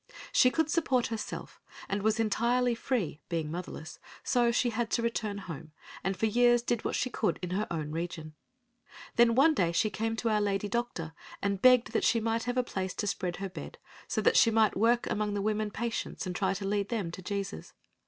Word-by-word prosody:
She 255 - +6
could 320 +3 +1
support 285 -6 +1
herself 220 - -6 0.3
and 200 +1 -1
was 220 +2 +1
entirely 235 +3 +2
free, 225 - -2
being 160 -3 -2
motherless, 170 -1 -7 0.2
so 240 -1 +3
she 240 +1 +1
had 230 0 -1
to 235 - 0
return 220 -3 -1
home, 160 -5 -8 0.3
and 190 0 -1
for - - +1
years 240 +2 +4
did 240 -2 -1
what - - -1
she 255 - -1
could 220 - 0
in 180 - -3
her 205 +3 -1
own 155 -3 -3
region. 160 -1 -5 0.8
Then 235 -1 +5
one 300 +5 +6
day 175 - +1
she 210 +5 +1
came 225 +3 -2
to 230 +1 -1
our 210 -1 +2
lady 200 0 0
doctor 205 -9 -3 0.3
and 200 -1 -1
begged 250 -2 +6
that - - 0
she 230 - +3
might 225 +1 -1
have 245 +1 -2
a 250 - +3
place 190 -5 -4
to 210 - -2
spread 180 -3 -2
her 195 +1 -5
bed 185 - -8 0.3
so - - -1
that - - +4
she 230 - +7
might 220 -1 +3
work 235 +4 +3
among 210 -2 -1
the - - -1
women 215 +1 0
patients 225 0 -3
and 180 -1 -4
try 195 0 0
to 195 0 -4
lead 200 0 0
them 205 -8 -2
to 185 - -8
Jesus. 195 - -5
215 Hz, 210 wpm, -30 LUFS, 190-235 Hz, 0.8 s, she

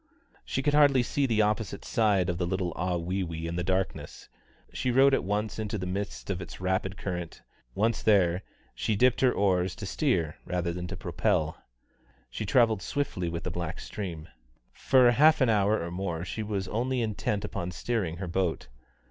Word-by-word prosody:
She 135 - -2
could 145 - +2
hardly 145 -4 +5
see 140 +3 0
the 110 -3 +3
opposite 105 -1 -2
side 100 -5 +2
of 90 -1 -2
the 90 - 0
little 90 -2 -1
Ahwewee 90 -1 -2
in 85 +1 -3
the 90 - -1
darkness; 95 +1 -3 0.4
she 125 - -1
rowed 135 +3 +5
at - - +2
once 105 +3 -2
into 110 -1 -2
the 90 - -4
midst 100 +2 -4
of 95 -1 -3
its - - -9
rapid 95 +1 -1
current; 90 -3 -5 0.3
once 110 +3 +1
there, 95 -4 +3 0.3
she 110 - -1
dipped 125 +4 +3
her 130 -2 +5
oars 95 -4 +1
to 105 - -7
steer 90 - 0
rather 90 -1 -2
than 90 0 -5
to 100 +1 -6
propel. 80 -1 -1 0.7
She 110 - -4
travelled 115 -4 +3
swiftly 95 -12 -2
with 85 0 -4
the 90 - -3
black 85 -2 -4
stream. 85 -6 -6 0.5
For 125 -2 +4
half 150 +6 +5
an 130 -4 +3
hour 105 0 +3
or 85 +1 -4
more 90 -2 -3
she 110 - -4
was 100 -2 -3
only 125 +3 -1
intent 105 -1 -1
upon 85 -3 -4
steering 90 -3 -2
her 95 0 -5
boat. 85 -5 -1
95 Hz, 180 wpm, -28 LUFS, 90-110 Hz, 0.7 s, hardly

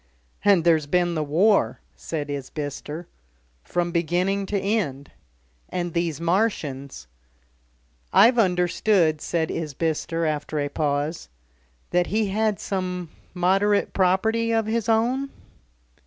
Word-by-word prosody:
"And 200 -4 +5
there's 160 -3 +3
been 175 +2 +1
the 155 -2 -1
War," 165 - +2 0.2
said 145 - -5
Isbister. 145 +3 -5 0.6
"From 175 -1 -1
beginning 180 +4 0
to 205 - -1
end." 185 -10 -2 0.6
"And 175 -2 -3
these 170 -4 -1
Martians." 165 - -1 1.1
"I've 240 +1 +6
understood," 180 -3 +2
said 160 -2 -1
Isbister 165 +1 -2
after 155 0 -2
a 145 -1 -1
pause, 145 - -2 0.6
"that 180 0 +2
he 215 -1 0
had 215 +1 0
some 180 -3 -3 0.3
moderate 195 +3 +2
property 220 +5 +2
of 225 -1 +1
his 230 +1 -1
own?" 245 +5 +1
175 Hz, 110 wpm, -24 LUFS, 155-200 Hz, 1.1 s, I've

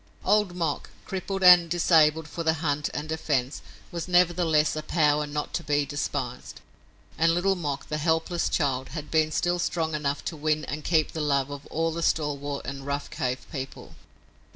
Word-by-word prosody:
Old 210 -4 +2
Mok, 165 -5 -2 0.2
crippled 195 0 -4
and 175 -2 +8
disabled 160 -2 +3
for 165 +2 -5
the 160 0 +2
hunt 145 -2 -1
and 150 +1 -4
defense, 145 -4 -1 0.3
was 170 0 -4
nevertheless 175 -4 +3
a 155 - -2
power 150 -2 +2
not 150 0 -4
to 170 - -2
be 145 -1 +1
despised, 140 -4 -4 0.6
and 165 +1 +4
Little 195 +3 +2
Mok, 145 -6 -4
the 150 - -3
helpless 160 +2 0
child, 135 -4 0
had 150 -1 -7
been 155 -1 +2
still 175 +3 0
strong 165 -2 -1
enough 145 -2 -2
to 165 - -3
win 155 0 0
and 150 +2 -5
keep 160 -3 +2
the 160 - -4
love 140 -2 +1
of 145 0 -8
all 165 +1 -1
the 170 +1 -4
stalwart 145 -3 -1
and 135 +1 -6
rough 140 0 -3
cave 125 +1 -3
people. 135 -2 -7
155 Hz, 175 wpm, -26 LUFS, 145-170 Hz, 0.6 s, and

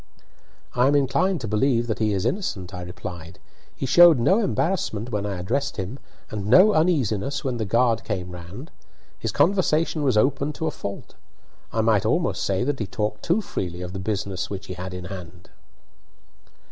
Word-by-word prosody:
"I 125 +1 +3
am 145 - +3
inclined 165 +5 +1
to 115 - -4
believe 115 +3 +2
that 110 -2 -3
he 110 -1 +1
is 95 -2 -1
innocent," 100 - -2
I 90 - -6
replied. 90 -1 -8 0.4
"He - - -3
showed 170 +2 +7
no 185 - +3
embarrassment 165 - -1
when 105 -1 -1
I 100 -2 -3
addressed 135 +10 -2
him, 100 +7 -5 0.3
and 105 -2 -4
no 185 - +7
uneasiness 140 - +1
when 130 -3 -2
the 110 - -2
guard 115 +1 +2
came 90 -4 -4
round. 90 - -9 0.5
His - - -2
conversation 165 -5 +2
was 130 -6 +2
open 140 +5 +1
to 160 - -4
a 160 - 0
fault. 100 -7 -7 0.6
I 115 - +1
might 110 -3 +3
almost - - 0
say 95 +1 0
that 140 +1 -1
he 110 - -2
talked 105 +1 -3
too 180 +6 +1
freely 90 - -4
of 90 +1 -6
the 95 - -5
business 95 -2 -3
which 100 -2 -6
he 95 - -6
had 90 0 -6
in 90 -1 -6
hand." 90 -1 -10
110 Hz, 185 wpm, -24 LUFS, 95-140 Hz, 0.6 s, showed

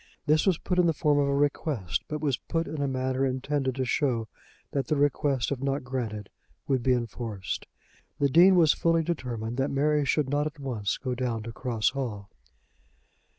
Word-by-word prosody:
This 155 +4 +3
was 185 -4 +4
put 180 +1 -1
in 175 - +5
the 165 - +3
form 145 0 +2
of 140 - +2
a 140 - +1
request; 140 - -1
but 150 -1 -4
was 140 -4 +1
put 165 +5 -3
in 155 - -4
a 140 - +1
manner 130 0 -1
intended 130 0 -1
to 130 -1 -1
show 125 -4 0 0.4
that 140 -1 -1
the 155 - +1
request 140 -2 +1
if 135 -2 -2
not 135 0 -1
granted 115 -5 -4 0.4
would 130 -2 +1
be 130 +1 +3
enforced. 115 -5 -4 0.5
The 140 - +3
Dean 175 +7 +6
was 165 -4 +5
fully 165 -1 +2
determined 120 -8 -3
that 135 +1 +1
Mary 150 +2 +2
should 140 +1 +1
not 145 +2 +1
at 155 +1 -8
once 120 -8 -2
go 130 -2 -3
down 120 -3 -2
to 115 - -6
Cross 115 -3 0
Hall. 110 -8 -5
135 Hz, 195 wpm, -27 LUFS, 120-150 Hz, 0.5 s, Dean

